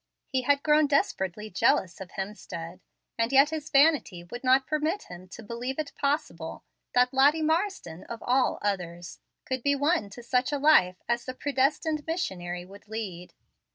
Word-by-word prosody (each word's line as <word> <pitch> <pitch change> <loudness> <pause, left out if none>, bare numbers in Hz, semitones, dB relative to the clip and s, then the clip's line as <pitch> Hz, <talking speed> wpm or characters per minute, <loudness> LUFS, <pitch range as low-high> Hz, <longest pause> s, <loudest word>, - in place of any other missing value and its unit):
He 260 -2 0
had 280 +2 +2
grown 300 0 +4
desperately 210 -7 -1
jealous 185 -1 +1
of 185 - -7
Hemstead, 185 -3 -6 0.4
and 230 +2 +1
yet 275 +3 +5
his 315 -1 -4
vanity 275 - +3
would 240 +9 -9
not 260 +1 +4
permit 310 +5 -1
him 180 +1 -11
to 225 - -11
believe 240 +4 -4
it 305 -2 -4
possible 280 - -2 0.3
that 250 +1 +4
Lottie 290 +4 +4
Marsden, 320 - -1
of 230 -1 -8
all 255 +1 +2
others, 175 -4 -3 0.3
could 260 -1 -2
be 285 +3 +2
won 285 - +1
to 240 +4 -11
such 250 +3 +1
a 290 - 0
life 270 -12 +4
as 235 0 0
the 255 - -5
predestined 290 +3 0
missionary 180 - -3
would 200 +3 -15
lead. 195 -5 -6
250 Hz, 165 wpm, -27 LUFS, 190-290 Hz, 0.4 s, yet